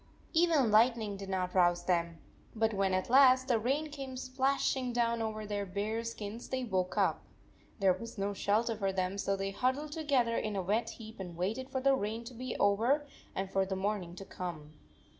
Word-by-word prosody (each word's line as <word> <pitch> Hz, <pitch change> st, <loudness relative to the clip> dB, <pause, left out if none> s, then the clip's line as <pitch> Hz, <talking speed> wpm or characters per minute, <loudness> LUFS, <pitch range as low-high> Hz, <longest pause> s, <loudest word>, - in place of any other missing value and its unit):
Even 320 Hz, -8 st, +4 dB
lightning 220 Hz, -1 st, +3 dB
did 195 Hz, 0 st, -8 dB
not 185 Hz, -1 st, -1 dB
rouse 175 Hz, -1 st, +3 dB
them, 170 Hz, -2 st, 0 dB, 0.4 s
but 220 Hz, 0 st, +1 dB
when 195 Hz, -1 st, +1 dB
at 185 Hz, 0 st, 0 dB
last 260 Hz, 0 st, +6 dB
the 240 Hz, -4 st, +3 dB
rain 285 Hz, +7 st, -1 dB
came 270 Hz, -3 st, -6 dB
splashing 260 Hz, 0 st, 0 dB
down 235 Hz, -1 st, +1 dB
over 215 Hz, -1 st, -3 dB
their 205 Hz, -1 st, -2 dB
bare 205 Hz, +4 st, -2 dB
skins 230 Hz, 0 st, -6 dB
they 260 Hz, -1 st, -2 dB
woke 185 Hz, -6 st, -1 dB
up. -, -, +2 dB, 0.5 s
There 195 Hz, -3 st, +4 dB
was 230 Hz, +5 st, -8 dB
no 200 Hz, +1 st, -1 dB
shelter 220 Hz, +4 st, +1 dB
for 195 Hz, -2 st, -1 dB
them, 190 Hz, +1 st, -2 dB
so 195 Hz, 0 st, 0 dB
they 195 Hz, 0 st, -3 dB
hud 255 Hz, +6 st, +1 dB
dled 295 Hz, +1 st, -7 dB
together 275 Hz, -7 st, +1 dB
in 215 Hz, -2 st, -2 dB
a 195 Hz, -, 0 dB
wet 210 Hz, +6 st, 0 dB
heap 220 Hz, -2 st, -10 dB
and 175 Hz, -3 st, -7 dB
waited 220 Hz, +9 st, -2 dB
for 265 Hz, -1 st, -2 dB
the 275 Hz, +1 st, +4 dB
rain 225 Hz, -2 st, -2 dB
to 245 Hz, +2 st, -9 dB
be 255 Hz, +2 st, -5 dB
over 235 Hz, +9 st, +3 dB, 0.3 s
and 190 Hz, 0 st, -3 dB
for 195 Hz, -, +2 dB
the 190 Hz, 0 st, -3 dB
morning 190 Hz, -3 st, -2 dB
to 195 Hz, -, -8 dB
come. 160 Hz, -6 st, -7 dB
215 Hz, 200 wpm, -32 LUFS, 195-255 Hz, 0.5 s, last